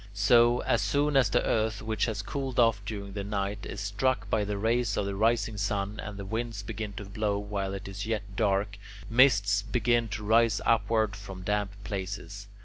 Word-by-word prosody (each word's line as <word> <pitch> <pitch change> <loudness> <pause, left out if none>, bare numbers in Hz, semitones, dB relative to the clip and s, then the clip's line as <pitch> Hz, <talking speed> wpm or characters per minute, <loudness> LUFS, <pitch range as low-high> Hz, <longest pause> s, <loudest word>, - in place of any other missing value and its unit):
So, 120 +3 +5
as - - +1
soon 145 0 +1
as 130 -6 +5
the - - +1
earth, 110 0 0
which 110 -1 0
has 110 -3 -3
cooled 135 -3 -3
off 115 -3 +4
during 100 -2 -5
the 100 -1 -4
night, 100 0 -3
is - - -6
struck 105 +6 0
by 110 - +2
the 105 0 -3
rays 115 0 +1
of 100 - 0
the 100 - -3
rising 110 +1 +1
sun, 100 0 -2
and 100 -1 -6
the 100 - -6
winds 110 0 -3
begin 105 0 -5
to 105 - -7
blow 100 +1 -1
while 100 -1 -3
it 100 0 -7
is 100 +2 -5
yet 110 -2 -1
dark, 100 -1 0 0.3
mists 100 -5 +5
begin 120 +2 +1
to 105 0 -5
rise 110 0 +3
upward 110 -2 +2
from 95 -2 -9
damp 105 0 0
places. 100 0 -5
105 Hz, 195 wpm, -28 LUFS, 100-115 Hz, 0.3 s, So